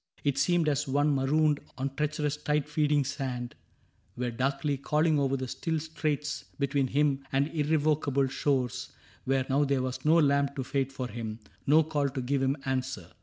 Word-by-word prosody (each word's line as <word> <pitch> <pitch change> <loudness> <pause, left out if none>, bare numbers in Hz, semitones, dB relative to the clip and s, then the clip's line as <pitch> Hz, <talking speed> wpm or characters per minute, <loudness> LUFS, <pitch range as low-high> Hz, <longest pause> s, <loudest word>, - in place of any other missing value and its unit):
It 140 -2 +1
seemed 175 -3 +2
as 145 -1 +1
one 145 +2 +2
Marooned 145 +2 +2 0.2
on 135 +1 -2
treacherous 150 0 -1
tide 150 -1 -1
feeding 150 -1 +2
sand 130 -3 -4 0.6
Were 125 0 -1
darkly 135 +4 0
calling 150 +3 +2
over 135 -1 +1
the 130 0 -4
still 160 +5 -2
straits 155 -1 -3
Between 140 -1 +1
him 140 0 +1
and 140 +2 +2
irrevocable 150 -3 +1
shores 130 -2 -1 0.3
Where 135 0 +1
now 140 +2 +2
there 140 -2 +1
was 130 -1 -4
no 160 +2 +5
lamp 140 -2 +2
to 135 - -2
fade 135 +1 -1
for 130 -2 -4
him. 110 -2 -5 0.3
No 155 +3 +6
call 150 -2 0
to 130 0 -4
give 135 +2 0
him 135 +2 +1
answer. 130 -8 -3
140 Hz, 170 wpm, -29 LUFS, 135-150 Hz, 0.6 s, No